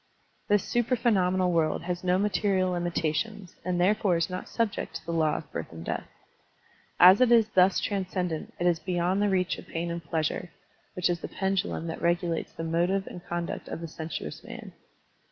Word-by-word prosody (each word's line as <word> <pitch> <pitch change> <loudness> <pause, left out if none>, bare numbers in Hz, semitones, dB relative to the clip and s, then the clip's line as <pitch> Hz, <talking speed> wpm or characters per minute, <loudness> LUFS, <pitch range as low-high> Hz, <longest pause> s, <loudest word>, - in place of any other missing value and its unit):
This 205 -1 +3
supra 240 +1 +1
phenomenal 185 -5 +2
world 160 -1 +1
has 175 0 -3
no 180 0 +3
material 195 -2 +1
limitations 175 +3 -2
and 180 0 -1
therefore 190 -1 +3
is 170 +2 -1
not 180 - -5
subject 230 -3 -2
to - - -6
the 170 - -3
law 155 -2 +2
of 150 - -9
birth 80 - -5
and 80 0 -9
death. - - -3 0.9
As 185 +5 +9
it 250 -2 +5
is 225 -2 +5
thus 185 -2 +4
transcen 185 -3 -1
dent, 160 -2 -5
it 175 - 0
is 175 -2 +3
beyond 180 +2 0
the 205 - +3
reach 185 -2 0
of - - -12
pain 170 +1 -3
and 170 0 -4
pleasure, 160 +3 -2 0.5
which 180 - +1
is 175 -1 0
the - - -5
pendtilum 190 -3 -1
that 165 - -5
regulates 170 -1 0
the 165 - -6
motive 175 +4 +1
and 175 - -9
conduct 170 0 -4
of - - -5
the 165 - -5
sensuous 160 - -6
man. - - -9
180 Hz, 190 wpm, -28 LUFS, 170-195 Hz, 0.9 s, As